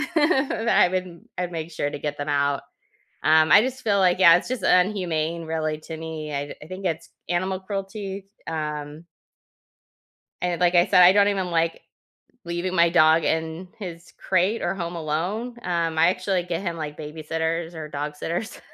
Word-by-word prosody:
I 265 - +3
wouldn't 185 -2 -5
I'd 180 0 -2
make 165 0 -5
sure 145 -2 -2
to - - -6
get 145 0 -4
them 145 +1 -4
out. 140 -1 +1 0.6
Um, 155 0 +5
I 205 - +9
just 260 +2 -3
feel 205 -4 +2
like 180 -1 +3
yeah, 170 -3 +8
it's 175 - -1
just 255 -1 -3
inhumane, 170 -4 +1
really, 155 -1 -2
to 160 +1 -8
me, 155 -2 -6
I 140 0 -2
d - - -7
I 150 - -11
think 185 +2 -7
it's 165 -2 -2 0.2
animal 185 +2 -1
cruelty, 195 0 -5 0.2
um 150 0 -5 1.4
And, 175 -1 -1
like 175 0 +3
I 175 0 +5
said, 180 - +6
I 180 +1 +9
don't 205 0 +4
even 190 -3 -1
like 165 -1 0 0.6
leaving 175 +2 -3
my 170 -1 +5
dog 160 -1 +5
in 160 +3 -2
his 175 -4 -8
crate 190 +4 +1
or - - 0
home 170 -2 -4
alone, 180 +10 -3
um, 165 -2 -1
I, 165 - +6
actually, 185 0 0
get 175 -1 -3
him, 170 -3 -3
like, 150 -2 -6
babysitters 160 +2 -3
or 155 -1 -6
dog 150 0 -4
sitters, 175 +9 -4
170 Hz, 180 wpm, -24 LUFS, 160-185 Hz, 1.4 s, I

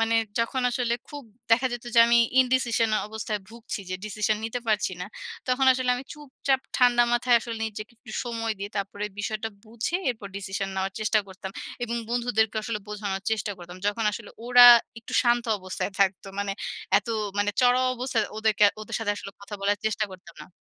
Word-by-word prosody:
মানে 225 0 +2 0.2
যখন 230 +3 0
আসলে 240 -1 0
খুব 290 -1 -8 0.3
দেখা 240 +3 +5
যেত, 240 0 -5
যে - - +5
আমি 235 0 +5 0.2
ইনডিসিশন 245 -3 +2 0.2
অবস্থায় 215 -1 -3
ভুগছি 230 -1 -6
যে - - -1
ডিসিশন 215 +1 0
নিতে 225 +2 -3
পারছি 210 -3 +1
না। 180 - -4 0.4
তখন 255 +1 +2
আসলে 255 -1 0
আমি 255 - -7
চুপচাপ 275 -2 -2 0.2
ঠান্ডা 245 -2 +5
মাথায় 240 0 +4
আসলে 230 -1 -5
নিজেকে 215 +1 -8
একটু - - -14
সময় 230 -2 -2
দিয়ে 200 +1 -5
তারপরে 200 +1 -3
বিষয়টা 215 +2 -2 0.2
বুঝে, 230 +9 -2
এরপর 220 -4 -7
ডিসিশন 195 0 -3
নেওয়ার 190 +1 -1
চেষ্টা 215 0 +2
করতাম। 190 0 -8 0.3
এবং 235 0 -3
বন্ধুদেরকে 230 -3 +1
আসলে 215 0 -3
বোঝানোর 200 -2 -3
চেষ্টা 215 -1 -1
করতাম। 175 0 -10
যখন 205 +2 0
আসলে 220 -1 -7 0.2
ওরা 245 0 +9 0.3
একটু 230 - -11
শান্ত 240 -1 +3
অবস্থায় 185 +1 -4
থাকতো। 195 0 +2
মানে 200 -1 -1 0.5
এত 205 - -11 0.3
মানে 205 0 +2
চড়াও 250 +1 +4
অবস্থায়, 245 -3 0
ওদেরকে 215 -1 +3 0.2
ওদের 215 +1 -4
সাথে 215 -2 0
আসলে 200 - -7
কথা 200 +1 -8
বলার 205 +1 +1
চেষ্টা 215 0 0
করতাম 190 +3 -13
না। - - -13
225 Hz, 180 wpm, -26 LUFS, 205-240 Hz, 0.5 s, ওরা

